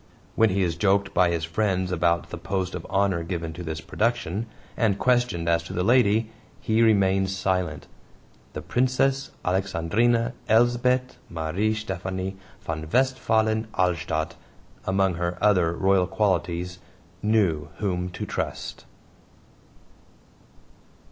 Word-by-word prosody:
When 110 -1 +4
he 95 +1 +1
is 85 -2 0
joked 100 +1 +2
by 90 -1 +4
his 85 -2 -1
friends 95 +2 0
about 85 -1 +1
the 85 - -5
post 95 +1 -2
of - - -6
honor 95 -3 +1
given 85 -1 -4
to 90 - -8
this 80 -1 -5
production, 115 -1 -1 0.3
and 105 -4 +1
questioned 120 -9 +1
as 85 0 +3
to - - -7
the 90 - 0
lady, 115 -1 +3 0.3
he 110 +1 +1
remains 95 -3 +3
silent. 90 -5 -1 0.7
The - - -6
Princess 135 +2 +1 0.2
Alexandrine 100 +6 +1 0.2
Elsbeth 120 +3 +2
Marie 85 +7 -1
Stephanie 95 -2 -4 0.3
von 80 -1 -5
Westphalen 110 -4 +2
Alstadt, 80 -3 0 0.5
among 95 -1 +2
her 85 0 -1
other 90 -6 +3
royal 95 +1 +2
qualities, 90 -3 -1 0.4
knew 95 -8 +1
whom 90 -3 -1
to 90 - -5
trust. - - -5
95 Hz, 120 wpm, -25 LUFS, 85-110 Hz, 0.7 s, When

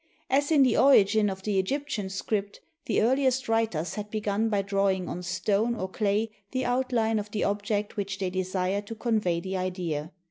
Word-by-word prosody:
As 285 +2 +2
in 290 -3 +6
the 255 - +3
origin 215 -5 +5
of 190 0 -6
the 205 -2 +1
Egyptian 220 -1 -2
script, 200 +1 -3 0.3
the 215 - +2
earliest 260 +1 +2
writers 225 -8 0
had 210 -1 -5
begun 215 +1 -1
by 205 -2 +1
drawing 195 -2 0
on 180 - -4
stone 200 +6 0
or 190 -4 -3
clay 210 +3 0 0.2
the 260 +2 -2
outline 245 -3 +1
of 210 0 -6
the 210 0 -2
object 205 +1 -1
which 195 -1 -3
they 190 -2 -2
desired 185 +2 -1
to 225 - -6
convey 215 -7 0
the 190 +2 -4
idea. 180 -4 -3
205 Hz, 180 wpm, -27 LUFS, 190-225 Hz, 0.3 s, in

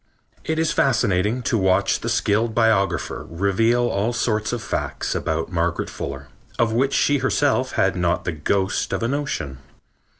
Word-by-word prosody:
It 160 - -2
is 160 0 +1
fascinating 110 -2 +1
to 115 - +1
watch 95 -1 +2
the - - -3
skilled 110 +2 +1
biographer 110 -4 +1
reveal 115 +7 +1
all 105 +4 0
sorts 110 -2 0
of 120 -3 -3
facts - - -3
about 80 +3 -2
Margaret 85 0 -1
Fuller 70 0 -6 0.3
of 115 -1 +2
which 135 +4 +1
she 145 -1 +3
herself 130 0 +1
had 95 0 +2
not 90 -1 0
the - - 0
ghost 95 +5 -1
of - - -1
a - - +1
notion. 130 - -3
110 Hz, 160 wpm, -22 LUFS, 90-120 Hz, 0.3 s, she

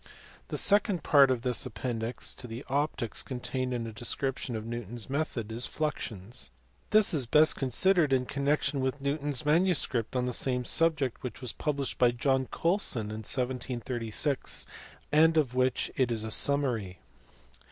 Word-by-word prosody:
The - - -3
second 200 -4 +3
part 140 -2 +6
of 125 -3 0
this 125 0 0
appendix 115 0 -3
to 125 - -7
the 115 +3 -8
Optics 135 -4 -2
contained 130 0 -3
a 115 -2 -4
description 125 +2 -3
of 110 0 -5
Newton 120 -1 -6
s 120 +2 -5
method 130 -7 -2
of 110 - -5
fluxions. 110 - -3 0.4
This 215 -3 +4
is 135 -6 +1
best 155 +5 +5
con 135 - -2
sidered 175 +2 +3
in 130 -1 +2
connection 140 +1 0
with 130 +2 -1
Newton 140 +1 -2
s 140 0 -1
manuscript 150 - +2
on 125 -1 +1
the 125 - -1
same 125 0 0
subject 155 -6 +1
which 125 -4 -6
was 125 -3 -5
published 140 -3 -2
by 125 - +5
John 130 +2 0
Colsoii 170 - +1
in 110 0 -5
1736, 125 +1 -1 0.5
and 160 +2 +5
of 140 -6 +2
which 130 0 0
it 130 -2 +1
is 110 -2 0
a 110 - -4
summary. 120 -10 +1
130 Hz, 165 wpm, -29 LUFS, 120-145 Hz, 0.5 s, part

